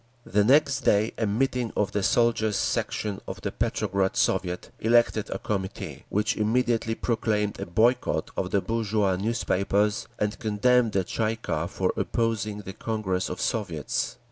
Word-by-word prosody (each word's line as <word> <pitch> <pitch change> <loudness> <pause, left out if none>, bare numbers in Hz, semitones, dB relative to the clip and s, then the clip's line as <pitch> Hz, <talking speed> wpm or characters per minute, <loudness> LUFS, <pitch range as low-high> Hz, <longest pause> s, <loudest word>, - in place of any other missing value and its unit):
The 105 +1 +2
next 140 +4 +4
day 105 +2 +2
a 110 - +1
meeting 125 +2 0
of 105 -1 +1
the 100 - 0
Soldiers' 110 0 +2
Section 105 -3 -1
of - - -6
the - - -3
Petrograd 95 -1 0
Soviet 90 -1 0
elected 115 -2 +3
a - - -2
Committee, 95 -3 -4
which 105 +2 +1
immediately 115 +1 +1
proclaimed 110 -4 -1
a - - -4
boycott 120 +8 +1
of 90 - -2
the 100 0 +1
bourgeois 110 -4 0
newspapers, 105 0 0
and 105 0 -2
condemned 115 +1 +2
the 95 - +2
Tsay 110 +4 -1
ee - - -5
kah 85 -7 -2
for 90 +1 -1
opposing 110 -3 -1
the 95 -1 -8
Congress 105 -4 -2
of 90 - -5
Soviets. 85 - -2
105 Hz, 155 wpm, -26 LUFS, 100-115 Hz, -, next